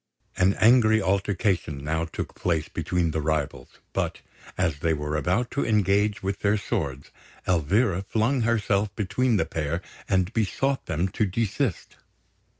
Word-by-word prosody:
An 95 Hz, +2 st, +3 dB
angry 110 Hz, -1 st, +5 dB
altercation 95 Hz, -7 st, 0 dB
now 80 Hz, +2 st, -1 dB
took 80 Hz, -, -6 dB
place 85 Hz, -4 st, -1 dB
between 85 Hz, -2 st, -1 dB
the 80 Hz, -, -1 dB
rivals; 75 Hz, -2 st, -2 dB, 0.2 s
but -, -, -2 dB, 0.4 s
as 70 Hz, -3 st, 0 dB
they 80 Hz, +1 st, +1 dB
were 75 Hz, 0 st, -3 dB
about 90 Hz, +10 st, 0 dB
to 140 Hz, -, 0 dB
engage 105 Hz, -1 st, +2 dB
with 95 Hz, 0 st, -2 dB
their 105 Hz, +1 st, +2 dB
swords, 70 Hz, -8 st, -3 dB, 0.4 s
Elvira 90 Hz, -, +2 dB
flung 115 Hz, +6 st, 0 dB
herself 105 Hz, -3 st, +1 dB
between 110 Hz, +4 st, +1 dB
the -, -, +1 dB
pair 80 Hz, +1 st, -2 dB, 0.3 s
and 95 Hz, +2 st, +1 dB
besought 135 Hz, +5 st, 0 dB
them 80 Hz, +4 st, 0 dB
to 105 Hz, +3 st, 0 dB
desist. 115 Hz, -, -2 dB
95 Hz, 145 wpm, -26 LUFS, 80-110 Hz, 0.4 s, angry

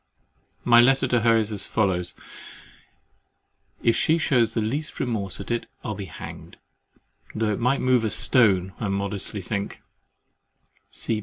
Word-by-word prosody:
My 120 Hz, -1 st, +6 dB
letter 135 Hz, +2 st, +3 dB
to 120 Hz, -, +3 dB
her 115 Hz, 0 st, +4 dB
is 110 Hz, -1 st, -1 dB
as 105 Hz, -, -3 dB
follows. 90 Hz, -5 st, 0 dB, 1.7 s
If 115 Hz, -, +3 dB
she 160 Hz, -, +2 dB
shews 125 Hz, -8 st, +1 dB
the -, -, +1 dB
least 140 Hz, +8 st, -3 dB
remorse 105 Hz, -6 st, -2 dB
at -, -, -6 dB
it, 120 Hz, -, -2 dB, 0.2 s
I'll 110 Hz, -, -3 dB
be 100 Hz, -1 st, -6 dB
hanged, 80 Hz, -, -10 dB, 0.8 s
though 110 Hz, -1 st, 0 dB
it -, -, -4 dB
might 125 Hz, +4 st, +1 dB
move 125 Hz, -2 st, +3 dB
a 110 Hz, -, 0 dB
stone, 95 Hz, -7 st, +4 dB
I 110 Hz, -, -2 dB
modestly 100 Hz, +1 st, -3 dB
think. 100 Hz, +1 st, -4 dB
110 Hz, 145 wpm, -24 LUFS, 100-125 Hz, 1.7 s, My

